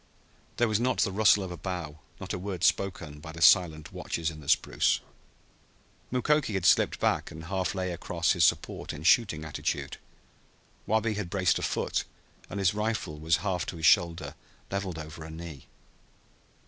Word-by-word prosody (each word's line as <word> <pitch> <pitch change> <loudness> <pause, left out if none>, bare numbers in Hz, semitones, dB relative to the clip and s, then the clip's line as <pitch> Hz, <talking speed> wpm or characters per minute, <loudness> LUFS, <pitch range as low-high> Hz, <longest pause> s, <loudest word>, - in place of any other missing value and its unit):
There 120 - +3
was 110 -1 +1
not 125 +2 +1
the 100 - +2
rustle 105 0 +4
of 95 - -6
a 90 - -6
bough, 85 -4 -5 0.2
not - - -5
a - - -3
word 95 -2 -5
spoken, 85 -6 0
by 80 +2 -9
the 80 - -10
silent 80 -4 +4
watchers 85 0 -3
in 75 - -11
the 70 -2 -9
spruce. - - +2 1.1
Mukoki 130 -2 +1
had 95 -2 -1
slipped - - +4
back - - +1
and 80 - -9
half 95 +4 -2
lay 95 -1 -2
across 85 0 -1
his 85 -4 +2
support - - +1
in 75 - -8
shooting 90 -4 +3
attitude. 75 - -3 0.9
Wabi 110 +1 +1
had 105 -4 -4
braced 90 -2 +2
a - - -6
foot, - - -1 0.5
and - - -5
his 95 -1 +3
rifle 105 -8 -2
was 80 +2 +2
half 90 -3 -1
to 85 - -5
his 80 - -2
shoulder, 85 -5 +3 0.4
leveled 95 -4 -3
over 75 +1 -8
a 80 - -9
knee. 80 -3 -9
90 Hz, 175 wpm, -28 LUFS, 80-100 Hz, 1.1 s, rustle